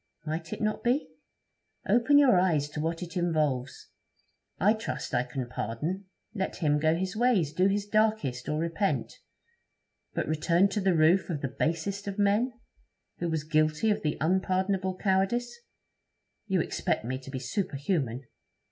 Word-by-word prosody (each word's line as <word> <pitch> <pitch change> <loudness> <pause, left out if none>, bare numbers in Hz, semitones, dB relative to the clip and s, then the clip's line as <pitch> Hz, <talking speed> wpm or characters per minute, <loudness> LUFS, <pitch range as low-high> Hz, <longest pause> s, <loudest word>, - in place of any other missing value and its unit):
'Might 160 +1 -4
it - - -5
not 215 0 -1
be?' 255 +5 +1 0.8
'Open 245 +5 +4
your 265 -10 +6
eyes 160 -6 +2
to 150 - -6
what 165 +3 -2
it 175 +2 -9
involves. 150 -7 -1 0.7
I 210 +3 +5
trust 220 -7 -5
I 120 - +3
can 125 0 -4
pardon. 150 - -3 0.3
Let 190 -4 -2
him 150 -4 +1
go 160 +1 +3
his 185 +3 -3
ways, 215 - +2
do 185 +4 +3
his 200 +1 0
darkest, 215 - 0
or 150 - 0
repent. 170 +5 -1 1.0
But - - -1
return 170 +5 +3
to 205 +1 -2
the 190 -2 +2
roof 165 +5 +4
of 155 -5 -3
the 135 - -2
"basest 195 +6 -1
of 200 0 -4
men," 210 +5 +2 0.7
who 170 - -1
was 160 -2 -1
guilty 155 +6 +2
of 205 - 0
"the 150 -1 -1
unpardonable 185 +2 0
cowardice"? 200 +6 +1 0.9
You 190 -4 +2
expect - - -1
me 130 +2 -3
to 135 - -11
be 135 - -4
superhuman. 135 - -2
175 Hz, 155 wpm, -28 LUFS, 150-200 Hz, 1.0 s, your